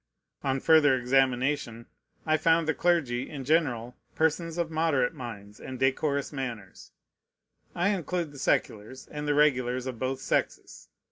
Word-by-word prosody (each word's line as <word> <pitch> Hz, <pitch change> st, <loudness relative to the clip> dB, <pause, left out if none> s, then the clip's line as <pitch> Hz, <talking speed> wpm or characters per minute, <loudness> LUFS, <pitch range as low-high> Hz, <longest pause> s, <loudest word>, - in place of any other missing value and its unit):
On 135 Hz, -1 st, 0 dB
further 150 Hz, -2 st, +5 dB
examination, 130 Hz, -1 st, 0 dB, 0.4 s
I 155 Hz, -, +3 dB
found 165 Hz, 0 st, +2 dB
the 160 Hz, -, +2 dB
clergy, 140 Hz, -8 st, 0 dB
in 140 Hz, -4 st, -7 dB
general, 125 Hz, -6 st, 0 dB, 0.2 s
persons 160 Hz, +1 st, 0 dB
of 170 Hz, -2 st, -1 dB
moderate 155 Hz, -6 st, +1 dB
minds 105 Hz, -4 st, -9 dB
and 130 Hz, -, -7 dB
decorous 140 Hz, +2 st, 0 dB
manners: 120 Hz, -8 st, -7 dB, 0.8 s
I 175 Hz, +3 st, +1 dB
include 180 Hz, -4 st, -2 dB
the 140 Hz, -, -11 dB
seculars, 110 Hz, +1 st, -1 dB
and 150 Hz, 0 st, -5 dB
the 145 Hz, -, +2 dB
regulars 130 Hz, -4 st, +2 dB
of 125 Hz, -3 st, -5 dB
both 130 Hz, +1 st, -2 dB
sexes. 135 Hz, -, -3 dB
135 Hz, 140 wpm, -28 LUFS, 125-160 Hz, 0.8 s, further